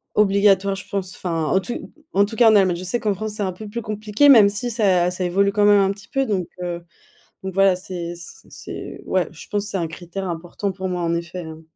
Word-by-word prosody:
obligatoire 200 Hz, -1 st, +3 dB
je 190 Hz, -, -9 dB
pense, 195 Hz, -2 st, -3 dB
enfin, 165 Hz, -3 st, -2 dB
en 190 Hz, +5 st, +2 dB
tout 240 Hz, -, -6 dB, 0.2 s
en 200 Hz, +1 st, +4 dB
tout 220 Hz, +2 st, -6 dB
en -, -, -11 dB
cas 230 Hz, -2 st, +7 dB
en -, -, +5 dB
Allemagne. 185 Hz, -3 st, +3 dB
Je 175 Hz, -, -7 dB
sais 210 Hz, +7 st, -1 dB
qu'en 210 Hz, -2 st, 0 dB
France 215 Hz, +2 st, -4 dB
c'est 210 Hz, -, -2 dB
un 190 Hz, -2 st, -2 dB
peu 210 Hz, +3 st, -9 dB
plus 235 Hz, +3 st, -4 dB
compliqué 215 Hz, +4 st, +1 dB
même 220 Hz, -7 st, +8 dB
si 210 Hz, +5 st, -2 dB
ça 190 Hz, -6 st, +2 dB
ça 185 Hz, 0 st, -3 dB
évolue 195 Hz, +3 st, +2 dB
quand 210 Hz, -, +2 dB
même 205 Hz, 0 st, +6 dB
un 195 Hz, 0 st, +2 dB
petit 200 Hz, 0 st, -11 dB
peu 270 Hz, 0 st, 0 dB
donc, 190 Hz, -7 st, -1 dB
heu, 175 Hz, -1 st, -4 dB, 0.6 s
donc, 190 Hz, -1 st, -5 dB
voilà, 195 Hz, -1 st, +5 dB
c'est 175 Hz, -2 st, -6 dB
c 170 Hz, 0 st, -10 dB
c'est, -, -, -8 dB
ouais, -, -, 0 dB
je -, -, -12 dB
pense 205 Hz, 0 st, -1 dB
c'est 200 Hz, -, -2 dB
un 165 Hz, -2 st, -2 dB
critère 175 Hz, +4 st, -6 dB
important 175 Hz, +4 st, -4 dB
pour 190 Hz, 0 st, -4 dB
moi 180 Hz, -1 st, -2 dB
en 170 Hz, 0 st, 0 dB
effet, 170 Hz, +2 st, -5 dB
hein. 160 Hz, -1 st, -9 dB
195 Hz, 255 wpm, -21 LUFS, 180-205 Hz, 0.6 s, même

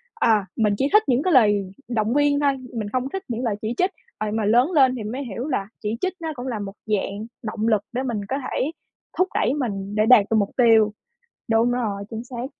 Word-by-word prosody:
à, 220 Hz, -, +3 dB
mình 210 Hz, -2 st, +2 dB
chỉ 270 Hz, -, +1 dB
thích 425 Hz, +1 st, +7 dB
những 260 Hz, +1 st, +2 dB
cái 365 Hz, -, +2 dB
lời 205 Hz, -6 st, +4 dB, 0.2 s
động 225 Hz, -1 st, 0 dB
viên 290 Hz, 0 st, +3 dB
thôi, 285 Hz, -1 st, +3 dB, 0.2 s
mình 215 Hz, -3 st, -3 dB
không 255 Hz, +4 st, -2 dB
thích 385 Hz, +5 st, -5 dB
những 235 Hz, 0 st, -3 dB
lời 225 Hz, -4 st, 0 dB
chỉ 220 Hz, +2 st, -2 dB
trích. 365 Hz, +1 st, +2 dB, 0.3 s
Ờ, 215 Hz, -, -2 dB
nhưng 210 Hz, -, -2 dB
mà 220 Hz, -2 st, 0 dB
lớn 240 Hz, -, +4 dB
lên 265 Hz, -6 st, +4 dB
thì 230 Hz, -, -5 dB
mới 245 Hz, +7 st, -4 dB
hiểu 240 Hz, +2 st, -5 dB
là 195 Hz, -10 st, -1 dB
chỉ 215 Hz, +1 st, -2 dB
trích 375 Hz, -, 0 dB
nó 325 Hz, -1 st, -3 dB
cũng 250 Hz, 0 st, -6 dB
là 235 Hz, -4 st, -3 dB
một 200 Hz, -1 st, -6 dB
dạng 210 Hz, 0 st, -2 dB, 0.2 s
động 215 Hz, 0 st, -2 dB
lực 215 Hz, -3 st, +3 dB
để 255 Hz, +2 st, -1 dB
mình 225 Hz, -6 st, -3 dB
có 270 Hz, -, 0 dB
thể 285 Hz, -, -1 dB, 0.5 s
thúc 370 Hz, -, +3 dB
đẩy -, -, +2 dB
mình 205 Hz, -8 st, -3 dB
để 215 Hz, 0 st, +3 dB
đạt 225 Hz, -3 st, +7 dB
được 225 Hz, -, +3 dB
mục 200 Hz, -2 st, +1 dB
tiêu. 225 Hz, -4 st, +5 dB, 0.6 s
Đúng 225 Hz, +1 st, +3 dB
rồi, 215 Hz, -5 st, -2 dB
chính 225 Hz, 0 st, -5 dB
xác. 245 Hz, 0 st, -5 dB
230 Hz, 245 wpm, -23 LUFS, 210-260 Hz, 0.6 s, thích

